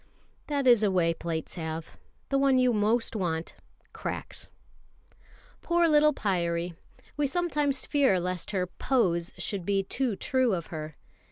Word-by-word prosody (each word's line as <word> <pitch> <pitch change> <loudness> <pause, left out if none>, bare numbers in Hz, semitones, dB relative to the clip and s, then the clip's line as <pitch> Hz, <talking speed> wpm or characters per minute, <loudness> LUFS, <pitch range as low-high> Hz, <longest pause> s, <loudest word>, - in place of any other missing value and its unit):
That 285 -2 -1
is 240 -4 +6
a 210 - +3
way 175 -3 +2
plates 165 -1 -4
have. 160 -1 -5 0.4
The 275 - +2
one 275 -1 +4
you 255 -1 +4
most 225 +3 +1
want 170 -5 -2 0.4
cracks. - - -5 1.1
Poor 345 0 +3
little 300 -1 +5
Pyârie; 175 - -1 0.4
we 295 -1 +2
sometimes 295 -3 0
fear 275 -11 +3
lest 180 0 -3
her 190 -3 0
"pose" 180 -4 0
should 200 -4 -4
be 195 +1 +1
too 240 +3 -1
true 255 0 +1
of 170 -2 -4
her. 155 -1 -6
205 Hz, 145 wpm, -28 LUFS, 170-270 Hz, 1.1 s, is